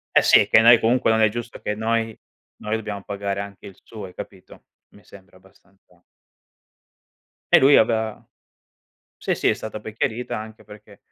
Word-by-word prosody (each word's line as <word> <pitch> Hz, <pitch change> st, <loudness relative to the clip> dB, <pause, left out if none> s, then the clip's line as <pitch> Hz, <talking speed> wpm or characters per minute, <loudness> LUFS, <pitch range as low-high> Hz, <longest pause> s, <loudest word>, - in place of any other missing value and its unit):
Eh -, -, +7 dB
sì, -, -, +5 dB
che 110 Hz, -, +5 dB
noi 120 Hz, 0 st, +7 dB
comunque 120 Hz, +1 st, +1 dB
non 110 Hz, 0 st, +2 dB
è 110 Hz, -, +4 dB
giusto 120 Hz, +1 st, -7 dB
che 105 Hz, -, -3 dB
noi 115 Hz, +1 st, -2 dB, 0.4 s
noi 105 Hz, +1 st, -3 dB
dobbiamo 105 Hz, -2 st, -5 dB
pagare 100 Hz, -1 st, -4 dB
anche 100 Hz, -1 st, -9 dB
il 95 Hz, -, -11 dB
suo, 110 Hz, -4 st, -10 dB
hai 90 Hz, -, -12 dB
capito. 95 Hz, 0 st, -12 dB, 0.2 s
Mi 100 Hz, -, -21 dB
sembra 95 Hz, -2 st, -17 dB
abbastanza 95 Hz, +1 st, -26 dB, 1.7 s
E -, -, +7 dB
lui 140 Hz, +2 st, +6 dB
aveva 110 Hz, -1 st, 0 dB, 0.9 s
sì, -, -, -2 dB
sì, -, -, 0 dB
è -, -, +2 dB
stata 110 Hz, -1 st, -8 dB
poi 110 Hz, 0 st, -9 dB
chiarita, 115 Hz, +2 st, -3 dB
anche 110 Hz, 0 st, -11 dB
perchè 105 Hz, -1 st, -16 dB
110 Hz, 175 wpm, -22 LUFS, 100-110 Hz, 1.7 s, Eh